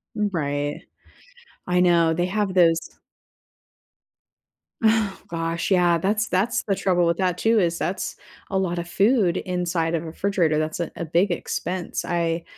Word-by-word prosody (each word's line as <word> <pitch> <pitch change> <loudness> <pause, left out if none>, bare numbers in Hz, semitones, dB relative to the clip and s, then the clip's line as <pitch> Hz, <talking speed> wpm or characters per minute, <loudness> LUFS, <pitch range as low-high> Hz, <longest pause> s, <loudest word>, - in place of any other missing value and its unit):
Mm, 210 -1 0
right. 145 -2 -2 0.9
I 180 0 +2
know, 170 -2 +4
they 175 +2 0
have 200 0 -1
those 170 -3 +4 2.0
Oh, 220 -3 +2
gosh, 165 +2 -2
yeah, 175 -2 +4
that's 210 +5 0
that's 190 +6 0
the 195 - 0
trouble 180 -2 +1
with 170 - +2
that, 180 -2 0
too, 225 +2 +3
is 170 -3 +1
that's 185 +1 -3 0.3
a 195 - -1
lot 175 -2 -1
of 170 0 -4
food 200 -3 +2
inside 175 -2 -1
of 165 - -2
a - - -9
refrigerator, 170 -2 0
that's 155 +1 -3
a 170 - -3
a 170 - -3
big 175 +5 +2
expense, 175 +1 -3
I 170 -1 -1
175 Hz, 155 wpm, -23 LUFS, 165-190 Hz, 2.0 s, know